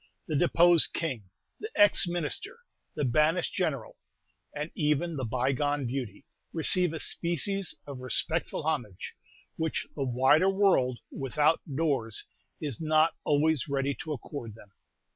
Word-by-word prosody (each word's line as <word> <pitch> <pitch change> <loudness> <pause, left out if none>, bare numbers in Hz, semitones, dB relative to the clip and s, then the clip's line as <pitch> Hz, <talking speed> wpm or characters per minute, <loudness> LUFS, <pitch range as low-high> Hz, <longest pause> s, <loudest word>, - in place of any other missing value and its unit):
The 155 - -2
deposed 170 +1 +5
king, 130 - -3 0.3
the 435 - -6
ex 205 -2 +5
minister, 175 - -3 0.3
the 150 - -1
banished 155 +7 +2
general, 145 -11 -2 0.5
and 150 +2 -5
even 150 +2 0
the 130 -3 -3
bygone 135 +4 0
beauty, 120 -5 -5 0.3
receive 175 +1 +2
a 160 - -5
species 175 +3 -1
of 140 -3 -8
respectful 160 +6 -1
homage, 125 - -3 0.4
which 160 -1 -2
the 140 - -2
wider 130 +8 +4
world 190 -11 +2
without 150 +4 +1
doors 135 -8 -1 0.3
is 145 -4 -5
not 155 +1 +3
always 150 -1 +2
ready 140 0 0
to 155 - -6
accord 120 -5 -6
them. 105 -3 -16
150 Hz, 130 wpm, -29 LUFS, 130-165 Hz, 0.5 s, deposed